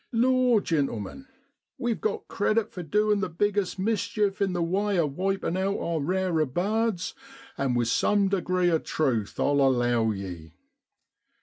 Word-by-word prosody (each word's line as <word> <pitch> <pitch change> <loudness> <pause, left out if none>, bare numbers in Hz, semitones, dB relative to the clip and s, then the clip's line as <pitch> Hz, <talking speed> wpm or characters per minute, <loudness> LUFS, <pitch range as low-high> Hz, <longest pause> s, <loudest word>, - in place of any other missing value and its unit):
Law, 250 -1 +3
gentlemen, 150 - -2 0.5
we've 240 -4 -2
got 215 - -2
credit 215 +2 0
for 180 - -6
doin' 210 +5 +1
the 190 -2 -2
biggest 200 +2 0
mischief 205 0 -1
in 195 -1 +2
the 175 -1 0
way 195 +3 0
of 150 -5 0
wipin' 195 -1 -1
out 195 +2 0
our 165 -1 -2
rarer 180 +1 +1
birds 200 - -1 0.4
and 135 -3 0
with 120 -1 +1
some 200 - +2
degree 185 -2 +1
of 160 - +1
truth, 120 -9 -1
I'll 140 0 +2
allow 120 -4 +2
ye. 90 -6 -6
185 Hz, 145 wpm, -26 LUFS, 140-205 Hz, 0.5 s, Law